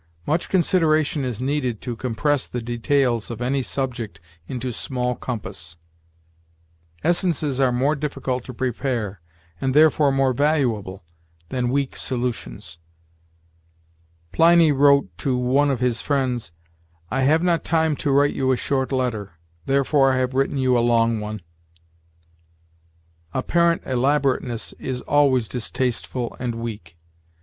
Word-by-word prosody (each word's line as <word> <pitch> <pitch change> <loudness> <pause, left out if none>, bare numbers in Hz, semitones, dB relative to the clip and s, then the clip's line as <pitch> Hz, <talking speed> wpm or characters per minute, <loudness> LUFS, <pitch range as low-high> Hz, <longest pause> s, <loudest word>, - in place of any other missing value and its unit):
Much 160 +3 0
consideration 155 -5 +2
is 125 -2 -3
needed 130 -5 -1
to 120 - -5
compress 130 +4 -1
the 125 - -4
details 120 0 0
of 115 -2 -6
any 130 +3 0
subject 125 -4 -4 0.3
into 125 -1 -4
small 125 +1 -2
compass. 95 -10 -6 1.3
Essences 160 -6 0
are 130 -2 +3
more 135 +5 +1
difficult 135 -4 -3
to 130 - -8
prepare, 120 - -3 0.4
and 130 0 0
therefore 150 -2 +5
more 135 -1 +2
valuable, 120 - 0 0.5
than 125 -1 -1
weak 140 +1 -1
solutions. 120 - -4 1.5
Pliny 165 - +5
wrote 140 -9 +3
to 130 -2 0
one 130 +4 +2
of 130 -3 -1
his 125 -2 0
friends, 130 - -1 0.6
'I 135 - 0
have 155 +5 +3
not 170 -2 +1
time 160 -2 +1
to - - -2
write 140 +1 +3
you 130 -1 +1
a 130 - +2
short 135 0 -1
letter, 115 -8 -2 0.3
therefore 135 0 +3
I - - +1
have 130 0 0
written 135 +2 0
you 130 -1 +2
a - - +4
long 115 -1 +2
one.' 105 -2 -6 1.9
Apparent 170 +5 +2
elaborateness 130 -2 0
is 125 -1 -4
always 135 -5 +2
distasteful 120 +2 -3
and 120 -2 -3
weak. 105 -8 -7
130 Hz, 130 wpm, -22 LUFS, 120-145 Hz, 1.9 s, therefore